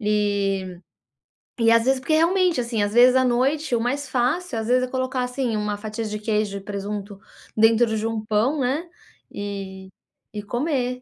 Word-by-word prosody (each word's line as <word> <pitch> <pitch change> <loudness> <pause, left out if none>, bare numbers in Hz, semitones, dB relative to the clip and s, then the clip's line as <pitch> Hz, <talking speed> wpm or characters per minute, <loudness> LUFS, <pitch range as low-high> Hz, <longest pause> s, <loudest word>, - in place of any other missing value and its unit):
e 200 -3 0 0.8
e, 230 0 +5
às 230 0 +4
vezes, 265 +1 +2
porque 275 +4 -1
realmente, 340 -2 +3
assim, 235 -3 -2
às 205 0 -1
vezes 250 +2 +6
à 260 - +3
noite 260 +3 +1
o 230 - 0
mais 275 +4 -2
fácil 260 +3 -1
às 220 - -3
vezes 255 +1 +3
é - - -1
colocar, 255 0 -2
assim, 250 -3 -2
uma 210 0 -2
fatia 215 +2 -5
de 210 0 -4
queijo 210 -2 -1
e - - -8
presunto 200 0 -6 0.4
dentro 225 0 +4
de 220 +1 -1
um 225 -1 -3
pão, 225 +8 +1
né, 275 +7 -1 0.4
e 195 -2 -6 0.4
e 210 - -4
comer. 250 +2 -2
230 Hz, 180 wpm, -23 LUFS, 210-255 Hz, 0.8 s, vezes